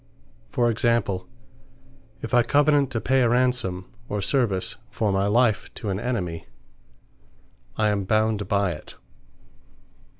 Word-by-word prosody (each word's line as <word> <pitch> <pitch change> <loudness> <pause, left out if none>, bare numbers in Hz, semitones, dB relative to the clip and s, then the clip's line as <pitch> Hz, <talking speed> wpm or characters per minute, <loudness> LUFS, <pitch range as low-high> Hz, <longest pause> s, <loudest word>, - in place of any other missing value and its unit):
For 120 -1 +1
example, 115 -5 0 1.0
if 115 - -6
I 120 - +6
Covenant 145 +1 +3
to 115 - -2
pay 130 +3 +2
a 120 - +3
ransome, 120 -7 +1 0.2
or 105 - -2
service 100 -3 0
for 110 -2 -1
my 95 +1 +1
life, 110 0 +2
to 105 - -5
an 95 - -2
enemy; 100 -9 -3 1.3
I 105 -1 +2
am 100 -2 -1
bound 110 0 +1
by 100 -2 +1
it. 75 - -9
110 Hz, 130 wpm, -24 LUFS, 100-120 Hz, 1.3 s, I